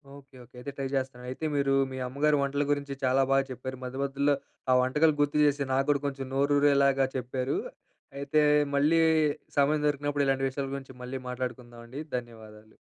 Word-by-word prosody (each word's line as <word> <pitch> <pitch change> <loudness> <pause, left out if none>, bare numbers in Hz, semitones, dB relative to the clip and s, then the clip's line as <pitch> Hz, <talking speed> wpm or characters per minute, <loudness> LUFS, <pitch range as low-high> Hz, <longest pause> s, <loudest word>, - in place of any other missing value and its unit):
Okay. 140 -1 -16
Okay. 120 +1 -21
అయితే 140 +3 -6
try 135 -1 -2
చేస్తాను. 130 -2 -3
అయితే 130 +5 -5
మీరు 140 -1 +2 0.2
మీ 130 - -6
అమ్మగారు 145 +3 +2
వంటల 140 +1 0
గురించి 140 -1 -1
చాలా 130 +1 +3
బాగా 135 0 +4
చెప్పారు. 130 +1 -6
మధ్యమధ్యలో 140 +2 0 0.4
ఆహ్, 130 - +6
వంటకాలు 150 +4 +3
గుర్తు 145 +1 +1
చేసి, 145 0 +1
నాకు 135 +1 +1
కూడా 140 -2 0
కొంచెం 135 -1 -4
నోరూరేలాగా 140 -1 +3
చెప్పారు. 130 +1 -2 0.6
అయితే 140 +2 +1 0.3
మళ్ళీ 150 +4 +3 0.6
సమయం 145 +2 +3
దొరికినప్పుడు, 145 0 0
ఇలాంటి 135 0 +1
విషయాల 135 +1 -4
గురించి 135 -1 -8
మళ్ళీ 130 +1 -5
మాట్లాడుకుందామండి. 125 +1 -6 0.2
ధన్యవాదాలు. 110 -3 -11
135 Hz, 160 wpm, -28 LUFS, 130-140 Hz, 0.6 s, ఆహ్